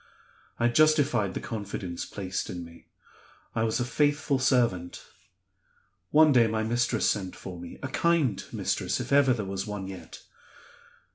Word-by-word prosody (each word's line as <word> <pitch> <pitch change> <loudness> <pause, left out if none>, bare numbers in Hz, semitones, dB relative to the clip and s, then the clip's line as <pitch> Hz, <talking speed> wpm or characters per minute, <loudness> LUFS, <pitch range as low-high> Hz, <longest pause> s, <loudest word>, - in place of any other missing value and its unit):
I 120 - +3
justified 140 - +3
the - - -2
confidence 100 -6 -5
placed 95 -1 -4
in 85 -1 -6
me; 85 0 -16 0.7
I - - -1
was 115 +2 0
a 120 - 0
faithful 145 +1 +1
servant. 120 -10 +1 1.0
One 155 0 +6
day 120 -4 +5
my 110 0 -1
mistress 120 +2 +1
sent 95 -3 -1
for 90 -2 -8
me 85 0 -9
a - - -1
kind 140 - +1
mistress, - - -1
if - - -5
ever 140 -1 +5
there 110 -5 -1
was 95 +1 -4
one 105 -2 -5
yet. 95 -1 -10
115 Hz, 150 wpm, -27 LUFS, 95-135 Hz, 1.0 s, One